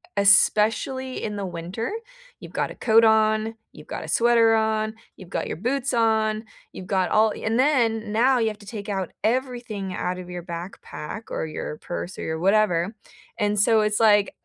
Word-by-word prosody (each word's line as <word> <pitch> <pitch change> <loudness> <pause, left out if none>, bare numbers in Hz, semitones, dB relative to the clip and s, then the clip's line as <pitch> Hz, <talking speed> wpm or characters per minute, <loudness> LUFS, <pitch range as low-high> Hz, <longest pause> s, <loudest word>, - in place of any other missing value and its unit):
especially 215 +6 +3
in 210 -1 -3
the 200 - -3
winter, 180 +6 -5 0.5
you've - - -11
got - - -1
a - - -9
coat 225 -1 +4
on, 220 0 +3 0.2
you've - - -14
got - - -5
a - - -8
sweater 230 -1 +4
on, 220 0 +1 0.2
you've 185 -3 -13
got - - -2
your - - -4
boots 250 - -1
on, 220 -2 +1 0.3
you've 185 - -9
got 190 -1 0
all 215 0 +4
and 225 +2 -1
then 230 -6 +2
now 250 +4 +3
you 230 -2 +1
have 210 -1 -4
to 205 - -14
take 205 -2 -7
out 190 -3 -2
everything 240 -5 -2
out 180 0 -3
of 180 0 -9
your 175 -1 -6
backpack 170 +3 -7
or 160 - -2
your 155 0 -5
purse 175 +1 -6
or - - -4
your 160 0 -3
whatever. 195 +1 +2 0.4
And 210 0 +1
so 220 +2 +4
it's 210 0 +1
like, 210 -2 +4
215 Hz, 185 wpm, -24 LUFS, 195-225 Hz, 0.5 s, coat